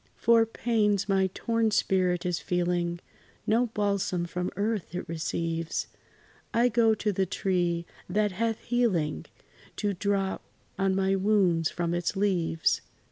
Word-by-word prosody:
For 230 -1 +4
pains 210 -4 +1
my 190 -1 +2
torn 230 -1 +1
spirit 185 -4 +1
is 175 -2 0
feeling, 175 -1 -1 0.4
No 235 +3 +2
balsam 200 -5 -1
from 180 +1 -3
earth 205 -3 -2
it 180 - -4
receives: 165 0 -2 0.7
I 240 +2 +4
go 225 -1 +3
to 215 0 -1
the 190 -1 0
tree, 175 -2 0 0.2
that 210 +2 +1
hath 225 +3 -1
healing 190 - 0 0.5
To 205 -1 -1
drop 195 0 -1 0.4
on 195 -1 +2
my 195 0 +2
wounds 190 -5 +2
from 170 -1 -2
its 175 +3 -1
leaves. 180 -5 +1
190 Hz, 135 wpm, -28 LUFS, 175-215 Hz, 0.7 s, For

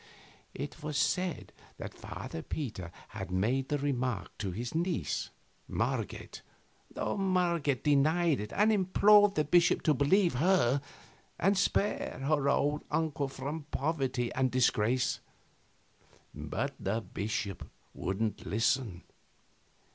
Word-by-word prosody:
It 140 - -6
was 150 -1 -3
said 180 +4 0 0.2
that - - -7
Father 80 - -7
Peter 110 - -5 0.2
had 100 -3 -6
made 115 +9 0
the 145 - +1
remark 125 -8 -2
to 100 - -2
his 115 +6 -4
niece, 175 +3 -1 0.4
Marget, - - -3 0.5
though - - -2
Marget 175 -8 +1
denied 155 +2 +3
it 105 +1 -5
and 215 +2 +4
implored 205 +1 +5
the 150 - +2
bishop 170 +3 +3
to 155 - +4
believe 170 +6 +3
her 145 -3 +3 0.6
and 195 +3 +3
spare 200 +1 0
her 140 -1 +2
old 145 +1 +1
uncle 150 -3 0
from 140 +3 -5
poverty 135 -5 -1
and 130 0 +1
disgrace. 125 -1 +2 1.1
But - - -3
the 110 +4 -1
bishop 100 -3 -4 0.2
wouldn't 105 +3 -2
listen. 110 -3 0
140 Hz, 115 wpm, -31 LUFS, 120-170 Hz, 1.1 s, implored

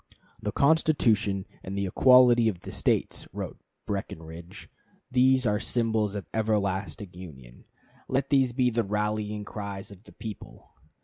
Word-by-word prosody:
"The - - -2
Constitution 115 -10 +2 0.2
and 95 +1 -5
the 100 - 0
equality 120 +2 +6
of 90 -5 -6
the - - -8
States," - - 0
wrote - - -6 0.3
Breckinridge, 85 0 -6 0.4
"these 130 0 +4
are 105 -1 +2
symbols 110 -3 0
of 100 - -4
everlasting 100 -4 -1
union. 65 -9 -12 0.4
Let 135 +2 -1
these 135 -3 +4
be 125 0 +2
the 115 0 +1
rallying 105 0 -2
cries 100 -1 -6
of 100 +1 -14
the - - -15
people." 110 -3 -9
105 Hz, 135 wpm, -27 LUFS, 95-120 Hz, 0.4 s, equality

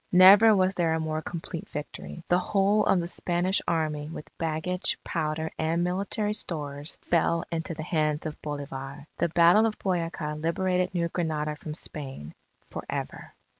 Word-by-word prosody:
Never 200 +4 +8
was 185 0 +3
there 165 -3 +1
a - - -1
more 155 0 -2
complete 165 0 -6
victory. 150 +3 -7
The 180 - +3
whole 200 +2 +2
of 190 - +4
the 170 - -2
Spanish 175 +2 0
Army 155 -2 -1
with 160 -2 -9
baggage, 165 +3 -1
powder, 155 +1 -2
and 165 +2 +1
military 200 +4 0
stores, 145 -6 -3
fell 170 0 +1
into 165 0 -3
the 155 - -5
hands 155 -2 0
of 155 -1 -5
Bolivar. 140 -1 -6
The - - +2
Battle 175 +7 +6
of 215 - -4
Boyaca 165 -5 -2
liberated 180 +2 0
New 170 -1 +1
Granada 155 -3 -2
from 150 0 -7
Spain, 135 - -5 0.3
for - - -6
ever. - - -5
165 Hz, 160 wpm, -27 LUFS, 155-180 Hz, 0.3 s, Never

